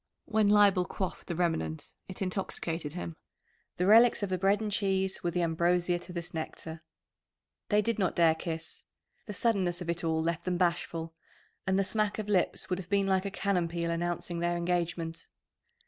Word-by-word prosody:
When 220 Hz, -2 st, +2 dB
Leibel 205 Hz, -3 st, +5 dB
quaffed 190 Hz, -2 st, -4 dB
the 170 Hz, -, -3 dB
remnant 160 Hz, -3 st, -1 dB
it 185 Hz, +1 st, -5 dB
intoxicated 170 Hz, -4 st, -3 dB
him. 170 Hz, -2 st, -5 dB, 0.6 s
The 180 Hz, -, +1 dB
relics 225 Hz, +2 st, +6 dB
of 200 Hz, -, -1 dB
the 185 Hz, -, +1 dB
bread 200 Hz, +2 st, +3 dB
and 215 Hz, -1 st, -3 dB
cheese 190 Hz, -2 st, 0 dB
were 175 Hz, -, +1 dB
the 175 Hz, +1 st, 0 dB
ambrosia 175 Hz, +2 st, +1 dB
to 175 Hz, +1 st, -11 dB
this 170 Hz, -1 st, -6 dB
nectar. 160 Hz, 0 st, -6 dB, 0.9 s
They 210 Hz, 0 st, +3 dB
did 230 Hz, -1 st, -1 dB
not 185 Hz, -3 st, +1 dB
dare 165 Hz, -2 st, +5 dB
kiss 160 Hz, 0 st, -6 dB, 0.4 s
the 210 Hz, -, -4 dB
suddenness 190 Hz, -5 st, +1 dB
of 170 Hz, -2 st, -2 dB
it 170 Hz, +1 st, -3 dB
all 160 Hz, -1 st, +1 dB
left 170 Hz, 0 st, -1 dB
them 180 Hz, -1 st, 0 dB
bashful, 170 Hz, -2 st, -1 dB, 0.5 s
and 190 Hz, 0 st, +2 dB
the 195 Hz, -, +3 dB
smack 210 Hz, +1 st, 0 dB
of 215 Hz, -1 st, -4 dB
lips 190 Hz, -4 st, +1 dB
would 180 Hz, 0 st, -1 dB
have 180 Hz, -2 st, -9 dB
been 200 Hz, -1 st, +2 dB
like 190 Hz, 0 st, +1 dB
a -, -, -1 dB
cannon 195 Hz, -3 st, 0 dB
peal 170 Hz, 0 st, -2 dB
announcing 175 Hz, 0 st, -2 dB
their 175 Hz, 0 st, 0 dB
engagement. 170 Hz, -1 st, -2 dB
180 Hz, 185 wpm, -30 LUFS, 170-195 Hz, 0.9 s, relics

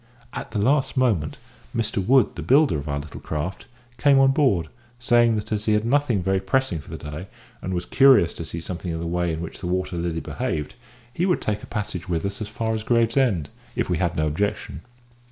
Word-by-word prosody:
At -, -, -5 dB
the 110 Hz, -, -4 dB
last 135 Hz, +6 st, +2 dB
moment 105 Hz, -13 st, +1 dB, 0.4 s
Mr 110 Hz, -3 st, -1 dB
Wood, 130 Hz, +5 st, +5 dB
the -, -, -6 dB
builder 140 Hz, -, +4 dB
of 70 Hz, +1 st, -6 dB
our 70 Hz, -, -1 dB
little 70 Hz, 0 st, -8 dB
craft, 80 Hz, +5 st, -4 dB, 0.3 s
came 140 Hz, -2 st, +5 dB
on 135 Hz, 0 st, +6 dB
board, 115 Hz, -, +2 dB, 0.3 s
saying 120 Hz, -2 st, +4 dB
that 105 Hz, +1 st, -4 dB
as 105 Hz, 0 st, -1 dB
he 110 Hz, -, +3 dB
had 105 Hz, +1 st, +1 dB
nothing 125 Hz, -6 st, +2 dB
very 95 Hz, +1 st, +1 dB
pressing 130 Hz, -, 0 dB
for 70 Hz, -, -13 dB
the -, -, -6 dB
day, 80 Hz, +6 st, -7 dB, 0.3 s
and 95 Hz, -, -4 dB
was 90 Hz, -1 st, -2 dB
curious 130 Hz, -11 st, +5 dB
to -, -, -6 dB
see 85 Hz, -, -6 dB
something 90 Hz, +1 st, -5 dB
of -, -, -4 dB
the 85 Hz, -, -4 dB
way 85 Hz, 0 st, 0 dB
in 80 Hz, 0 st, -3 dB
which 85 Hz, -, -8 dB
the 90 Hz, -, -4 dB
Water 90 Hz, 0 st, -1 dB
Lily 85 Hz, -1 st, -2 dB
behaved, 75 Hz, -2 st, -3 dB, 0.4 s
he 175 Hz, +7 st, 0 dB
would 180 Hz, -, +2 dB
take 105 Hz, 0 st, -2 dB
a -, -, -10 dB
passage 95 Hz, -4 st, -4 dB
with 85 Hz, 0 st, -1 dB
us 100 Hz, +2 st, -4 dB
as 105 Hz, -, -3 dB
far 110 Hz, +1 st, -2 dB
as 110 Hz, -, -2 dB
Gravesend, 115 Hz, -, +2 dB, 0.3 s
if -, -, -1 dB
we 90 Hz, -, +2 dB
had 85 Hz, -2 st, 0 dB
no 80 Hz, -, +1 dB
objection. 75 Hz, -2 st, -2 dB
100 Hz, 225 wpm, -24 LUFS, 85-120 Hz, 0.4 s, on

